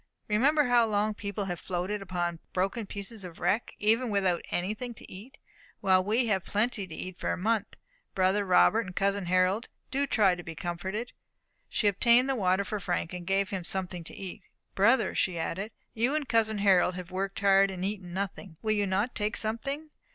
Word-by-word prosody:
Remember 275 +8 +3
how 245 -3 +4
long 210 0 +1
people 200 -1 -4
have 175 -3 -4
floated 185 +3 -3
upon 175 -3 -2
broken 195 +4 -1
pieces 200 +1 -5
of 175 -2 -9
a - - -16
wreck, 195 +6 0
even 225 +4 +2
without 190 -4 +1
anything 215 +7 -3
to - - -12
eat, 235 +9 -11 0.4
while 185 -1 +4
we 225 +5 +1
have 195 -5 +1
plenty 210 -1 -1
to 160 - -8
eat 185 +1 -7
for - - -1
a - - -1
month. 215 +2 0 0.4
Brother 190 +2 +2
Robert 200 +3 +4
and 180 - -9
cousin 200 -1 0
Harold, 185 +5 +2 0.2
do 280 +1 0
try 200 -7 +4
to 180 - -5
be 165 -1 -8
comforted." 190 +8 -4 0.6
She - - -1
obtained 235 +5 +4
the 270 - +1
water 190 -4 +2
for 210 +1 -3
Frank, 180 -2 -2
and 175 -1 -7
gave 195 +2 +1
him 190 -3 -3
something 180 -1 -1
to - - -11
eat. 195 +1 -7 0.3
"Brother," 230 +7 +3
she 180 -2 0
added, 185 +5 -3 0.2
"you 240 +6 +1
and 300 -3 -1
cousin 220 -3 +2
Harold 190 -3 +4
have 180 0 -7
worked 195 +1 -3
hard, 195 0 +5
and 185 -1 -4
eaten 195 -3 -4
nothing. 190 -2 -5
Will 215 - +1
you 205 -2 +1
not 200 +6 0
take 210 0 -1
something? 275 +8 -3
200 Hz, 195 wpm, -29 LUFS, 185-220 Hz, 0.6 s, hard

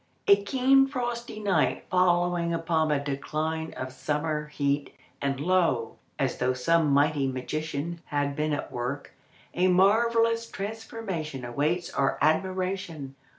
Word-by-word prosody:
A 200 - +8
keen 270 +4 +4
frosty 240 -4 -4
night 205 -2 +1
following 175 -2 +2
upon 165 -1 +1
the 150 -1 +2
decline 155 +3 -3
of 130 0 -6
summer 150 +2 -2
heat, 145 -1 -1 0.3
and 135 -1 -1
lo, 160 -9 +1 0.2
as 135 -2 -1
though 125 +1 +2
some 160 +5 +2
mighty 140 0 +3
magician 155 +5 -4
had 145 -1 -1
been 150 +1 -1
at 145 - -3
work, 125 +4 -4 0.4
a 180 +1 +2
marvellous 230 +5 +3
transformation 195 - -5
awaits 150 +8 -1
our 135 -1 +1
admiration! 180 -2 -1
160 Hz, 125 wpm, -27 LUFS, 140-190 Hz, 0.4 s, A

